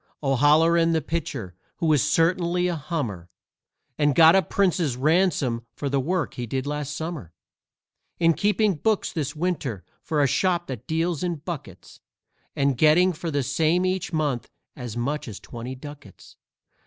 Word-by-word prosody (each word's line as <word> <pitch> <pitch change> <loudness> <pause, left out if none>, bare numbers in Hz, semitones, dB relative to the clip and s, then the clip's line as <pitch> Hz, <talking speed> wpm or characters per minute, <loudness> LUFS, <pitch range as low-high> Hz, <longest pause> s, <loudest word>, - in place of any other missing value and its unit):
O'Halloran, 160 +5 +4
the 160 - +1
pitcher, 145 - -4 0.2
who - - -2
was 155 -4 +4
certainly 170 +4 +2
a 175 - -1
hummer, 130 - -4 0.7
And 145 -2 +3
got 165 +1 +7
a 195 - +5
prince's 175 -10 0
ransom 140 -6 +1
for 140 - -3
the 140 0 +1
work 175 +5 -1
he 120 -1 -5
did 130 +3 -3
last 145 0 -3
Summer, 160 - -6 0.8
Is 165 -1 +4
keeping 210 0 +2
books 215 +6 0
this 145 -2 -3
Winter 150 - -3 0.2
for 150 -2 0
a - - +4
shop 175 +5 +1
that 125 -6 -7
deals 165 0 -1
in 175 -2 -1
buckets, 145 - -9 0.6
And 140 -3 +1
getting 175 +4 +5
for 170 +1 -5
the 145 -3 0
same 160 +6 +1
each 185 -1 -1
month 145 -6 -1 0.3
as 120 -3 -7
much 140 +5 -2
as 105 -4 -7
twenty 120 +2 -7
ducats. 145 +2 -12
150 Hz, 155 wpm, -24 LUFS, 135-170 Hz, 0.8 s, got